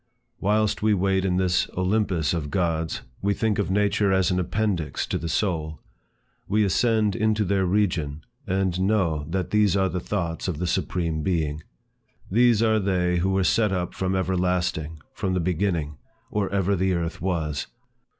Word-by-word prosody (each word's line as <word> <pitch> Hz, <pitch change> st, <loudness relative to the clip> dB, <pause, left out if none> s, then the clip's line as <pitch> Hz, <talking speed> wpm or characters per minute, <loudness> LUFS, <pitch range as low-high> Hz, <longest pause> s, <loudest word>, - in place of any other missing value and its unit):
Whilst 105 Hz, +1 st, +1 dB
we 105 Hz, 0 st, +3 dB
wait 95 Hz, 0 st, +1 dB
in 90 Hz, -1 st, +1 dB
this 90 Hz, -1 st, +1 dB
Olympus 95 Hz, -5 st, +1 dB
of 80 Hz, -4 st, -2 dB
gods, 85 Hz, -3 st, -1 dB, 0.2 s
we 100 Hz, +1 st, +1 dB
think 110 Hz, -3 st, 0 dB
of 100 Hz, -, 0 dB
nature 100 Hz, 0 st, +2 dB
as 95 Hz, -2 st, +2 dB
an 90 Hz, -, +1 dB
appendix 90 Hz, -3 st, -1 dB
to -, -, -2 dB
the 85 Hz, -, -4 dB
soul. 80 Hz, -4 st, -1 dB, 0.7 s
We 105 Hz, +2 st, +2 dB
ascend 105 Hz, +1 st, +2 dB
into 110 Hz, -1 st, +1 dB
their 95 Hz, 0 st, +1 dB
region, 85 Hz, -7 st, 0 dB, 0.2 s
and 95 Hz, -1 st, 0 dB
know 95 Hz, -7 st, +1 dB
that 90 Hz, 0 st, -2 dB
these 105 Hz, -2 st, +3 dB
are 95 Hz, -1 st, +2 dB
the 90 Hz, +1 st, -2 dB
thoughts 85 Hz, -3 st, -3 dB
of 90 Hz, -5 st, -2 dB
the 90 Hz, -, -2 dB
Supreme 85 Hz, -2 st, -1 dB
Being. 80 Hz, -3 st, -1 dB, 0.7 s
"These 115 Hz, +1 st, +4 dB
are 110 Hz, -1 st, +3 dB
they 90 Hz, -3 st, +1 dB
who 90 Hz, +2 st, +1 dB
were 95 Hz, 0 st, +2 dB
set 105 Hz, +2 st, +2 dB
up 90 Hz, -2 st, -2 dB
from 95 Hz, 0 st, -1 dB
everlasting, 90 Hz, -4 st, -1 dB
from 95 Hz, -1 st, -2 dB
the -, -, +1 dB
beginning, 85 Hz, -4 st, -1 dB, 0.3 s
or 105 Hz, -2 st, 0 dB
ever 100 Hz, 0 st, +1 dB
the 95 Hz, 0 st, +1 dB
earth 85 Hz, -1 st, -3 dB
was. 80 Hz, -6 st, -2 dB
95 Hz, 170 wpm, -25 LUFS, 85-100 Hz, 0.7 s, These